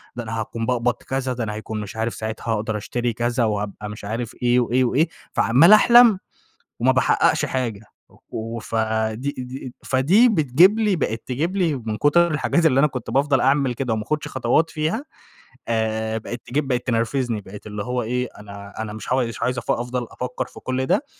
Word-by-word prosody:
ده 120 - -4
أنا 115 0 -4
هاكون 115 +1 -4
باقبض 120 0 +1
كذا، 130 +1 -3
ده 115 -3 -3
هيكون 110 0 -5
مش 105 0 -8
عارف 115 +1 -2
ساعاتها 110 0 -5
هاقدر 110 0 -2
أشتري 120 +3 -2
كذا، 120 +1 0
وهابقى 105 0 -3
مش 105 -1 -9
عارف 115 +3 -4
إيه، 125 0 +3
وإيه، 125 +2 +2
وإيه، 145 +7 +2 0.2
فعمّال 135 - +5
أحلم، 235 -2 +7 0.6
وما - - +3
باحققش - - +2
حاجة 120 -6 -2 0.3
و - - -23 0.4
وف 115 0 -7 0.4
دي 135 +6 -4
دي 130 0 -7
فدي 170 - +4
بتجيب 175 - +4
لي 210 -4 +2
بقت 115 -7 -2
تجيب 160 +9 -2
لي 170 -6 +1
من 110 -4 -4
كُتر 170 +7 +3
الحاجات 165 +2 +1
اللي 135 -4 +3
أنا 150 - +5
كنت 125 -4 -6
بافضل 140 -1 +2
أعمل 135 -2 +2
كده، 125 -1 -2
وما 110 -1 -1
أخدش 150 +7 -2
خطوات 130 +6 +1
فيها، 160 - -2 0.6
آآ 110 -1 -1
بقت 120 +2 -6
تجيب 140 +2 -1
بقت 125 -1 -1
تنرفزني، 115 -1 0
بقت 100 +2 -11
اللي 105 -1 -5
هو 125 +1 -2
إيه، 125 +3 -1
أنا 100 -1 -10
أنا 110 -1 -5
مش 110 +3 -4
ه - - +4
مش 115 -3 -2
عايز 125 0 0
أف - - -2
أفضل 120 0 -2
أفكّر 125 0 -4
في - - -13
كل 130 0 -2
ده، 285 - +1
125 Hz, 195 wpm, -22 LUFS, 110-140 Hz, 0.6 s, أحلم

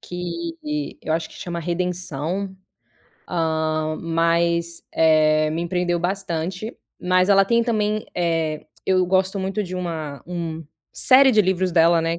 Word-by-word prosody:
que 180 - -5 0.5
eu - - -2
acho 160 0 -1
que - - -16
chama 170 -1 -5
Redenção, 180 +1 -3 0.7
hã, 160 -2 -1
mas, 170 0 0
eh, 155 -1 +4
me 170 +2 -2
prendeu 175 -1 0
bastante. 185 +2 -3 0.2
Mas 185 +1 +2
ela 195 -1 +6
tem 235 +3 +2
também, 215 -2 0
eh, 165 -3 -1 0.2
eu 185 -1 +3
gosto 190 +2 +1
muito 195 +2 -2
de 185 0 -7
uma 160 -6 -5
um 165 -2 -5 0.3
série 265 +1 +6
de 215 -2 +5
livros 185 -1 0
dela, 165 0 +5
né, 165 +1 -1
175 Hz, 140 wpm, -22 LUFS, 165-190 Hz, 0.7 s, ela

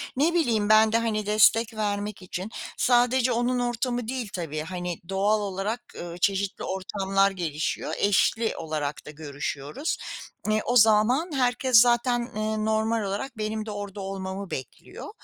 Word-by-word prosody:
Ne 305 +6 +2
bileyim, 230 -11 +1
ben 215 0 +6
de, 225 - +3
hani, 220 -2 -1
destek 215 +2 +4
vermek 205 -1 -3
için. 185 +3 -6 0.3
Sadece 245 +1 +3
onun 245 +1 +1
ortamı 245 0 -1
değil 245 -3 -3
tabii, 160 -4 -4
hani, 175 +1 -5
doğal 200 +3 +2
olarak, 205 +4 -3 0.2
ııı, 170 0 -7
çeşitli 195 +2 0
ortamlar 195 +1 0
gelişiyor, 160 -5 -3
eşli 220 +3 +2
olarak 155 -3 -4
da - - -8
görüşüyoruz. 145 - -4 0.7
O 245 - 0
zaman 225 - +4
herkes 250 -1 +3
zaten, 240 0 +3 0.2
ııı, 215 0 -1
normal 220 +1 +1
olarak 205 +6 -4
benim 215 0 -3
de 215 - -5
orada 205 -1 -6
olmamı 195 0 -5
bekliyor. 130 -3 -7
215 Hz, 140 wpm, -26 LUFS, 190-235 Hz, 0.7 s, ben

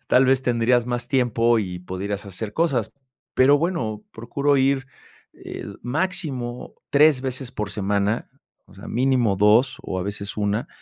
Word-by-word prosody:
tal 130 +1 +5
vez, 130 0 +3
tendrías 120 -1 +2
más 120 0 -3
tiempo 120 -3 +2
y 90 -4 -3
podrías 95 +3 -5
hacer 100 +2 -6
cosas". 140 - 0 0.4
Pero 140 +3 +5
bueno, 140 - -2
procuro 140 +5 0
ir, 135 0 +2 0.5
eh, - - -8 0.2
máximo 135 -4 -3 0.2
3 145 -2 +5
veces 130 -1 -4
por 105 -5 -4
semana, 100 +2 -1 0.4
o - - -19
sea, 100 - -11
mínimo 125 -4 +2
2 105 +6 +4
o 95 - -3
a - - -2
veces 100 +1 -5
1, 105 +4 -1
120 Hz, 150 wpm, -23 LUFS, 105-135 Hz, 0.5 s, tal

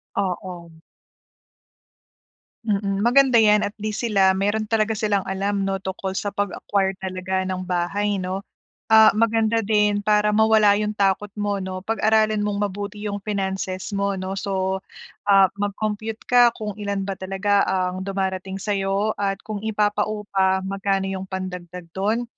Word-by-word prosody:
Oo. 180 -3 -4 1.9
Mm, 200 -1 0
maganda 255 0 +5
'yan, 210 -1 +5
at 205 - -3
least 215 +1 -3
sila, 195 -5 +3
mayro'n 205 +3 0
talaga 220 0 0
silang 205 -2 +1
alam 200 +1 -1
'no, 195 0 -1
tungkol 190 0 -5
sa 205 - -3
pag-acquire 195 -1 -1
talaga 190 0 -3
ng 185 -1 -3
bahay 185 +3 -1
'no. 185 +1 -3 0.5
Ah, 220 0 +8
maganda 225 0 +2
din 210 -1 +2
para 210 0 +2
mawala 215 -1 +5
yung 210 0 -2
takot 195 0 +1
mo 205 -1 -1
'no. 185 0 -5
Pag-aralan 215 -1 +2
mong 205 0 0
mabuti 205 +1 -6
yung 205 -1 -3
finances 190 -2 -3
mo, 200 0 0
'no. 185 +1 -4
So, 190 -1 -2 0.5
ah, 195 -2 +6
mag-compute 215 +2 -3
ka 245 -1 +6
kung 210 -2 -4
ilan 200 -1 -2
ba 195 - -2
talaga 195 +2 +1
ang 185 0 -1
dumarating 190 -1 -3
sa'yo, 195 +1 0
at 195 -1 0
kung 215 -2 -4
ipapaupa, 205 -3 0
magkano 195 0 -1
yung 190 0 -4
pandagdag 180 -2 -6
do'n? 215 +5 0
200 Hz, 140 wpm, -23 LUFS, 190-210 Hz, 1.9 s, Ah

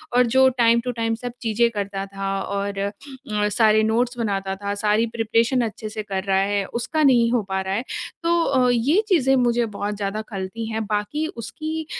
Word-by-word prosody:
और 250 0 +5
जो 265 0 +6 0.2
time 230 0 +5
to 250 +1 -3
time 225 -1 -1
सब 245 +2 -6
चीज़ें 235 +1 +2
करता 200 -2 -3
था 195 0 -5
और 200 +1 -3
अ, 200 +1 -1 0.6
सारे 215 0 +4
नोट्स 240 +3 +1
बनाता 195 -4 -2
था, 200 +1 -4
सारी 210 +2 +2
प्रिपरेशन 230 +3 +1
अच्छे 220 -1 -4
से 215 0 -5
कर 195 -2 -3
रहा 195 -1 +1
है, 200 +1 +1
उसका 295 - -2
नहीं 240 -4 +4
हो 240 -2 +2
पा 190 0 0
रहा 190 0 -3
है। 225 +5 -1 0.4
तो 330 -7 +2
ये 265 - +3
चीज़ें 270 - +3
मुझे 240 -2 +2
बहुत 205 +1 -2
ज़्यादा 200 +1 -3
खलती 195 +2 -5
हैं। 220 0 -2
बाकी 210 +9 -1
उसकी 315 +7 -5
225 Hz, 190 wpm, -22 LUFS, 200-245 Hz, 0.6 s, जो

